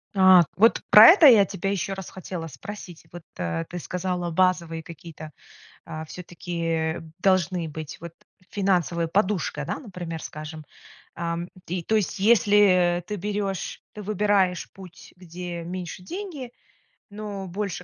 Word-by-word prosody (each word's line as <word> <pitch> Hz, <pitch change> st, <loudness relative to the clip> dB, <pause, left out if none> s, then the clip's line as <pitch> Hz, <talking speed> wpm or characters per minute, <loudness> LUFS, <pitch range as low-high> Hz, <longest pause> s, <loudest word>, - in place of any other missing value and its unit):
А, 185 Hz, -2 st, +7 dB
вот 225 Hz, +4 st, +4 dB
про 215 Hz, +2 st, +10 dB
это 335 Hz, -3 st, +8 dB
я 220 Hz, -6 st, +7 dB
тебя 195 Hz, 0 st, -4 dB
еще 195 Hz, 0 st, -2 dB
раз 190 Hz, -2 st, -7 dB
хотела 180 Hz, -3 st, -7 dB
спросить. 175 Hz, -, -10 dB
Вот, 175 Hz, -, -9 dB, 0.2 s
а, 85 Hz, -2 st, -2 dB
ты 175 Hz, -, -8 dB
сказала 180 Hz, 0 st, -3 dB
базовые 170 Hz, -2 st, +1 dB
какие-то, 160 Hz, -1 st, -11 dB, 0.5 s
а 160 Hz, 0 st, -7 dB
все-таки, 175 Hz, +1 st, -7 dB
э, 160 Hz, -1 st, -1 dB, 0.2 s
должны 185 Hz, -2 st, +1 dB
быть 155 Hz, -1 st, -7 dB
вот 170 Hz, 0 st, -9 dB, 0.4 s
финансовая 180 Hz, -4 st, 0 dB
подушка, 185 Hz, -5 st, -1 dB
да, -, -, -4 dB
например, 175 Hz, -, -7 dB
скажем, 155 Hz, +1 st, -8 dB, 0.5 s
ам, 170 Hz, +1 st, -3 dB, 0.2 s
и 175 Hz, 0 st, -3 dB
то 220 Hz, -, 0 dB
есть 210 Hz, -2 st, -1 dB
если, 200 Hz, -5 st, +4 dB
э, -, -, -8 dB
ты 195 Hz, +4 st, -6 dB
берешь, 200 Hz, -1 st, -3 dB
ты 210 Hz, -, -8 dB
выбираешь 200 Hz, -3 st, +1 dB
путь, 185 Hz, -3 st, -14 dB
где 175 Hz, -1 st, -7 dB
меньше 180 Hz, +1 st, -6 dB
деньги, 315 Hz, -, -7 dB, 0.6 s
но 205 Hz, -2 st, -6 dB
больше 190 Hz, -1 st, -4 dB
180 Hz, 145 wpm, -25 LUFS, 170-200 Hz, 0.6 s, про